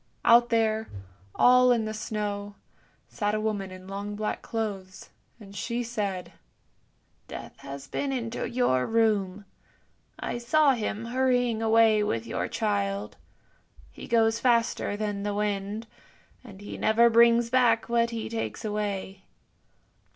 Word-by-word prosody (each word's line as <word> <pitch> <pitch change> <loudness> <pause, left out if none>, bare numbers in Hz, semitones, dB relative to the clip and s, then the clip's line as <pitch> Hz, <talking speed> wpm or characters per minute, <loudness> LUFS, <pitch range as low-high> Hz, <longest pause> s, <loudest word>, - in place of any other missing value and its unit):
Out 240 +1 +6
there, 220 -1 +1 0.5
all 250 0 +6
in 230 -3 +2
the 215 - -4
snow, 205 -2 -4 0.5
sat 210 -1 -2
a - - -1
woman 210 -3 -2
in 185 0 -11
long 200 +1 -5
black 215 0 -3
clothes, 200 -5 -5 0.3
and 200 -2 -13
she 235 +4 -2
said, 205 -6 -4 0.5
" - - -42
Death - - -8
has 140 0 -9
been 275 - -2
into 235 -3 -3
your 235 - +1
room. 210 -4 +1 0.7
I 240 - -4
saw 285 +5 +3
him 225 -2 -3
hurrying 245 -2 +1
away 225 -1 +4
with 115 - -1
your - - -3
child; 100 0 -2 0.8
he - - -10
goes 225 -1 +2
faster 235 -4 +1
than 205 -1 -3
the 205 0 -2
wind, 205 +1 -2 0.6
and 200 -5 -13
he 205 - -8
never 230 +2 +4
brings 235 0 +4
back 245 -3 +3
what 235 0 +2
he 230 -1 -4
takes 225 0 -4
away." 200 -2 -3
220 Hz, 135 wpm, -27 LUFS, 200-235 Hz, 0.8 s, Out